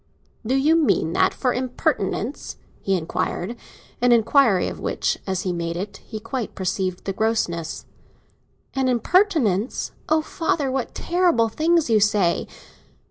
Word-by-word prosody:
"Do 245 +4 0
you 295 +4 +4
mean 280 - +2
that - - +3
for 255 - -1
an - - -1
impertinence?" 255 -1 -2 0.2
he 195 - +1
inquired; 175 +5 -3 0.5
an 245 0 +4
inquiry 230 -3 +4
of - - -6
which, - - -1
as 190 -1 -1
he 185 - -1
made 170 0 -3
it, 200 +2 -5
he 220 - -8
quite 230 +1 -5
perceived 185 -1 -2
the 195 - -2
grossness. 185 -7 -1 0.9
"An 265 -1 0
impertinence? 255 - +1 0.2
Oh, 315 0 +3
father, 305 -4 -1
what 265 -2 -3
terrible 345 -11 +2
things 325 +6 +2
you 220 - +5
say!" 205 -4 +2
230 Hz, 140 wpm, -23 LUFS, 190-270 Hz, 0.9 s, you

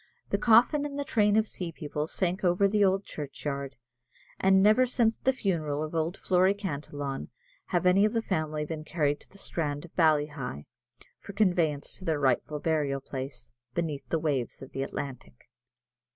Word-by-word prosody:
The - - +1
coffin 245 +6 +5
and 290 -1 -4
the 285 - -1
train 210 -4 +3
of 220 0 +3
sea 180 -4 -4
people 150 -1 -4
sank 185 +3 -1
over 180 +2 +4
the 205 +1 +2
old 195 0 +3
churchyard, 140 -1 -5 0.6
and 190 0 +5
never 215 +5 +5
since 235 -3 +2
the 265 - +3
funeral 160 - -1
of 155 - -5
old 165 +2 -1
Flory 185 +2 +3
Cantillon 145 -7 -4 0.4
have 180 0 0
any 185 +2 +5
of 215 +1 +2
the 225 -1 0
family 155 -5 -1
been 155 0 -5
carried 150 -2 0
to - - -18
the 200 - -16
strand 150 -5 -3
of 170 - -17
Ballyheigh, 150 - +1 0.5
for 200 - -10
conveyance 175 -8 +1
to - - -11
their 160 -3 0
rightful 140 +2 +1
burial 145 -3 0
place, 130 -2 -7 0.2
beneath 155 -5 -3
the 165 - +1
waves 140 -6 -2
of 135 - -11
the 135 - -4
Atlantic. 130 - -6
160 Hz, 175 wpm, -28 LUFS, 145-195 Hz, 0.6 s, coffin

